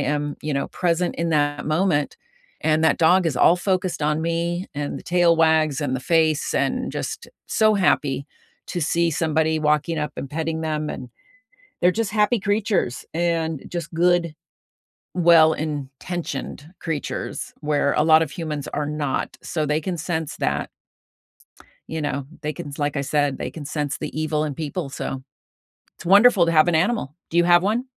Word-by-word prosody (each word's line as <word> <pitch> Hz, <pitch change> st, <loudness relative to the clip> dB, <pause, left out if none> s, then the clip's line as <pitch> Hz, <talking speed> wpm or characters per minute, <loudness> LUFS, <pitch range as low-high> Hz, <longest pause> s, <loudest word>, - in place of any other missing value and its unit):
am, 145 Hz, 0 st, -1 dB
you 150 Hz, -1 st, -2 dB
know, 140 Hz, -, -1 dB
present 175 Hz, 0 st, 0 dB
in 170 Hz, 0 st, -1 dB
that 145 Hz, -1 st, 0 dB
moment 155 Hz, -2 st, +1 dB, 0.4 s
and 155 Hz, 0 st, +2 dB
that 160 Hz, -, +3 dB
dog 175 Hz, +2 st, +4 dB
is 145 Hz, -6 st, -1 dB
all 175 Hz, -, +5 dB
focused 185 Hz, -1 st, -1 dB
on 150 Hz, +1 st, +1 dB
me 170 Hz, +2 st, -1 dB
and 145 Hz, 0 st, -3 dB
the -, -, -12 dB
tail 175 Hz, -2 st, +3 dB
wags 160 Hz, -2 st, +3 dB
and 135 Hz, -3 st, -1 dB
the 130 Hz, -, -2 dB
face 160 Hz, 0 st, +1 dB
and -, -, 0 dB
just -, -, -5 dB, 0.2 s
so 215 Hz, -1 st, +3 dB
happy 145 Hz, -7 st, +1 dB, 0.4 s
to 175 Hz, -, -3 dB
see 170 Hz, +2 st, +1 dB
somebody 160 Hz, 0 st, +1 dB
walking 150 Hz, +2 st, +1 dB
up 150 Hz, 0 st, -2 dB
and 135 Hz, -, -6 dB
petting 160 Hz, +1 st, -2 dB
them 155 Hz, -1 st, -2 dB
and 125 Hz, -1 st, -7 dB, 0.7 s
they're 180 Hz, -, +5 dB
just 215 Hz, +1 st, -2 dB
happy 215 Hz, +2 st, +2 dB
creatures 205 Hz, -, 0 dB
and 165 Hz, -3 st, -1 dB
just 170 Hz, -3 st, -5 dB
good, 170 Hz, -1 st, +2 dB, 0.8 s
well-intentioned 155 Hz, -3 st, +1 dB
creatures 160 Hz, -3 st, -4 dB
where 150 Hz, -1 st, +1 dB
a 150 Hz, -, +2 dB
lot 160 Hz, 0 st, +6 dB
of 160 Hz, -, 0 dB
humans 155 Hz, -4 st, -4 dB
are 150 Hz, 0 st, -1 dB
not. 150 Hz, -2 st, -3 dB
So, 155 Hz, -3 st, -2 dB
they 150 Hz, +1 st, +1 dB
can 180 Hz, +2 st, -3 dB
sense 160 Hz, -1 st, -3 dB
that -, -, -1 dB, 1.2 s
you 160 Hz, 0 st, -4 dB
know, 140 Hz, -2 st, -2 dB, 0.2 s
they 150 Hz, 0 st, -2 dB
can 145 Hz, -, -7 dB
s 140 Hz, -, -9 dB
like 145 Hz, 0 st, -1 dB
I -, -, 0 dB
said, 145 Hz, 0 st, 0 dB
they -, -, -4 dB
can 155 Hz, -3 st, -8 dB
sense 145 Hz, -1 st, -2 dB
the -, -, -4 dB
evil 155 Hz, -1 st, 0 dB
in 145 Hz, -3 st, -3 dB
people, 155 Hz, 0 st, -4 dB
so 135 Hz, -1 st, -5 dB, 0.7 s
it's -, -, -13 dB
wonderful 200 Hz, 0 st, +6 dB
to 165 Hz, -, +1 dB
have 155 Hz, +1 st, +5 dB
an 170 Hz, -, +2 dB
animal. 175 Hz, -, 0 dB, 0.2 s
Do 170 Hz, -, -3 dB
you 175 Hz, -, +5 dB
have 175 Hz, 0 st, +5 dB
one? 220 Hz, +5 st, 0 dB
160 Hz, 175 wpm, -23 LUFS, 150-175 Hz, 1.2 s, lot